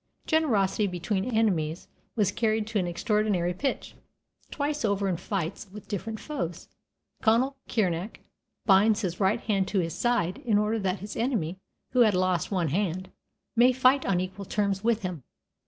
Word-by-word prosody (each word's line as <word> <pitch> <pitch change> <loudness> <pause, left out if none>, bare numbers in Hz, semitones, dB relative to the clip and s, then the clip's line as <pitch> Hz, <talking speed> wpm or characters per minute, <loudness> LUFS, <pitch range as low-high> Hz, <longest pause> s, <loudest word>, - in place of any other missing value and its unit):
Generosity 220 - +2
between 190 +2 -2
enemies 185 -9 0 0.3
was 205 -4 +2
carried 220 -1 0
to 220 -1 -1
an 180 - -1
extraordinary 185 -1 0
pitch. 270 +9 -3 0.6
Twice 295 -1 -2
over 200 -2 +1
in 185 - +1
fights 185 +1 -4
with 210 +1 -10
different 215 +2 -4
foes, 175 - -5 0.5
Conall 235 +5 +3 0.2
Cernach 190 -2 0 0.5
binds 210 +2 +5
his 180 -4 -3
right 205 +4 +2
hand 195 -3 0
to 205 - -1
his 165 -3 0
side 240 -7 0
in 220 -4 +1
order 210 +2 +1
that 190 -1 -1
his 205 +1 -6
enemy, 200 - -1 0.3
who 255 - +1
had 215 -5 +5
lost 180 -2 +1
one 180 -6 0
hand, 185 +2 -1 0.4
may 245 +2 +6
fight 260 +2 +4
on 190 -3 +1
equal 185 +2 -5
terms 200 0 -1
with 230 -1 +1
him. 180 -5 -4
205 Hz, 160 wpm, -27 LUFS, 185-225 Hz, 0.6 s, may